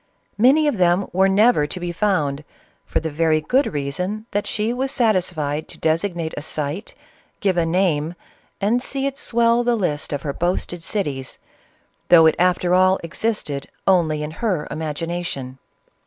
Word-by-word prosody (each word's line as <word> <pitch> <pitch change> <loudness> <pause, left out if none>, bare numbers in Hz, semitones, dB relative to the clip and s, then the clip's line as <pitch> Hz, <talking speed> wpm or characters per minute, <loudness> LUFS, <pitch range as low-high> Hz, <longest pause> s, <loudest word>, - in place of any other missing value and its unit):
Many 280 +7 +5
of 240 -9 0
them 180 +2 +3
were 190 +2 +4
never 200 -5 +4
to 180 - -5
be 175 0 -3
found, 160 -7 0 0.4
for - - 0
the 160 0 -4
very 155 +1 +2
good 260 - +1
reason 180 +10 -3
that 205 0 -1
she 220 +2 -1
was 265 +2 -2
satisfied 175 - 0
to - - -10
designate 165 0 -1
a - - -5
site, 155 +6 -5 0.4
give 195 -3 +1
a 170 -1 +1
name, 165 -2 +1 0.4
and 220 +5 +1
see 270 +1 -3
it 275 0 -3
swell 235 0 +2
the 240 0 +2
list 165 -9 -2
of 145 -2 -3
her 140 - -2
boasted 175 0 -2
cities, 145 -9 -3 0.7
though 165 -2 +8
it 160 - +6
after 180 0 +2
all 185 +1 +4
existed 165 -5 -3 0.2
only 160 -5 +2
in 150 - -4
her 180 -3 -2
imagina 165 +3 -3
tion. 130 -5 -6
175 Hz, 165 wpm, -21 LUFS, 155-210 Hz, 0.7 s, though